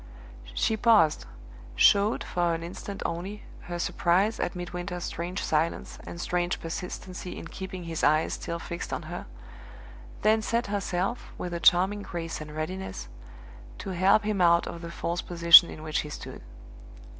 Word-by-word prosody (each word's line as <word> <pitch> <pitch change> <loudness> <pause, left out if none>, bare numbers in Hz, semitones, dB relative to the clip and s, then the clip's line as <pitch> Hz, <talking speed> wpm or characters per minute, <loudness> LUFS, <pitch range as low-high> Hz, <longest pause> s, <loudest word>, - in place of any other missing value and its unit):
She 220 - +1
paused 210 - +4 0.5
showed, 205 - +4
for 175 -1 0
an 165 - -5
instant 195 +3 -7
only, 185 +5 -4 0.2
her 175 0 -4
surprise 185 +5 +1
at 175 - -2
Midwinter's 175 0 -5
strange 175 +3 -4
silence 160 +2 -1
and 170 - -7
strange 175 0 -1
persistency 180 +2 -6
in 165 - -8
keeping 190 -1 -7
his 165 -1 -4
eyes 155 +2 +3
still 170 - -4
fixed 170 +1 -6
on - - -3
her - - -6 1.0
then 220 +1 +4
set 230 +2 0
herself, 200 +2 -2
with 175 -1 -5
a 170 - -2
charming 190 +5 +4
grace 165 -5 -5
and 150 0 -8
readiness, 170 - -5 0.7
to 195 - -6
help 190 +4 +4
him 210 -2 0
out 170 -1 +5
of 170 - -7
the 170 - -6
false 170 0 -3
position 170 0 +8
in 155 - -9
which 155 -1 -1
he 150 - -4
stood. - - -8
175 Hz, 155 wpm, -27 LUFS, 170-195 Hz, 1.0 s, position